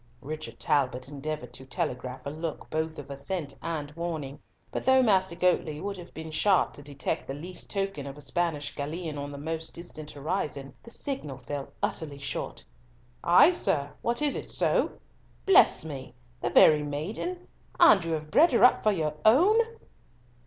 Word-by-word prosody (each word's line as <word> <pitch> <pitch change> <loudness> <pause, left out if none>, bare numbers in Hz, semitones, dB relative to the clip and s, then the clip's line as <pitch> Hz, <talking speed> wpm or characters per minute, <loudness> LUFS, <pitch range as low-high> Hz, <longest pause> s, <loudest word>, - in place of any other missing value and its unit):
Richard 155 +2 -6
Talbot 130 -3 +1
endeavoured 145 -3 -5
to 130 - -8
telegraph 125 0 -4
a 140 - -3
look 160 +1 -5
both 160 0 -2
of 145 -1 -8
assent 140 +1 -4
and 155 -3 -4
warning, 155 -4 -5 0.3
but - - -3
though 260 0 +5
Master 190 -6 +3
Goatley 170 -4 +1
would 200 +3 -4
have 175 -1 -10
been 160 0 -8
sharp 190 +4 +3
to - - -10
detect 140 -1 -3
the 135 - -4
least 175 +5 -8
token 195 -8 -2
of 135 +1 -8
a - - -11
Spanish 150 0 -1
galleon 155 +1 -4
on 145 0 -5
the 140 - -7
most 160 +2 -5
distant 155 -3 -8
horizon, 145 -3 -3
the - - -13
signal 230 - -4
fell 140 0 -6
utterly 145 -3 -2
short. 140 - -5 0.6
"Ay, 235 - +7
sir. 145 - 0
What, 240 +5 0
is 290 - +2
it - - -5
so? - - +2 0.5
Bless 385 - +6
me! 135 -5 -7 0.3
The - - 0
very 150 -1 +7
maiden! 175 - -4 0.3
And 275 - +7
you 165 -1 -2
have 155 -1 -4
bred 320 -1 +5
her 235 - +4
up 250 - +6
for 215 - +3
your 155 -6 -1
own." 350 - +6
155 Hz, 175 wpm, -28 LUFS, 145-185 Hz, 0.6 s, Ay